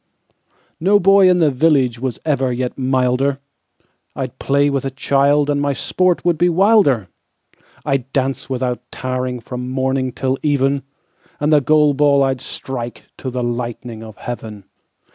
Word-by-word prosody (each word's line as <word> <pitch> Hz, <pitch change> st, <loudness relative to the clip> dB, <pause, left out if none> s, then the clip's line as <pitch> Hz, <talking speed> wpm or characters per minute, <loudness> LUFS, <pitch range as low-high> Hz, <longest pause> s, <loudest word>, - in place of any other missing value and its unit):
No 200 Hz, +5 st, +4 dB
boy 195 Hz, 0 st, +5 dB
in 180 Hz, -, +4 dB
the 160 Hz, -4 st, +3 dB
villageWas 130 Hz, -4 st, +1 dB
ever 135 Hz, -4 st, +1 dB
yet 125 Hz, 0 st, -3 dB
milder; 130 Hz, +1 st, +1 dB, 0.8 s
I'd 130 Hz, -3 st, -5 dB
play 140 Hz, +1 st, +2 dB
with 140 Hz, -2 st, -1 dB
a 135 Hz, -, -2 dB
childAnd 140 Hz, +2 st, +1 dB
my 145 Hz, 0 st, 0 dB
sport 180 Hz, +6 st, 0 dB
would 170 Hz, -3 st, +1 dB
be 175 Hz, +1 st, +4 dB
wilder; 175 Hz, -, +3 dB, 0.8 s
I'd 135 Hz, -1 st, -1 dB
dance 135 Hz, 0 st, -2 dB
without 125 Hz, -2 st, -2 dB
tiringFrom 125 Hz, -1 st, -4 dB
morning 130 Hz, 0 st, -1 dB
till 130 Hz, +2 st, -2 dB
even, 140 Hz, -2 st, +1 dB, 0.6 s
And 150 Hz, +1 st, +1 dB
the 150 Hz, -, +5 dB
goal 150 Hz, +1 st, +3 dB
ball 140 Hz, 0 st, +3 dB
I'd 135 Hz, -1 st, 0 dB
strikeTo 125 Hz, 0 st, -7 dB
the 125 Hz, 0 st, -3 dB
lightning 120 Hz, -1 st, -4 dB
of 110 Hz, -2 st, -11 dB
heaven. 110 Hz, -4 st, -7 dB
135 Hz, 140 wpm, -18 LUFS, 125-145 Hz, 0.8 s, boy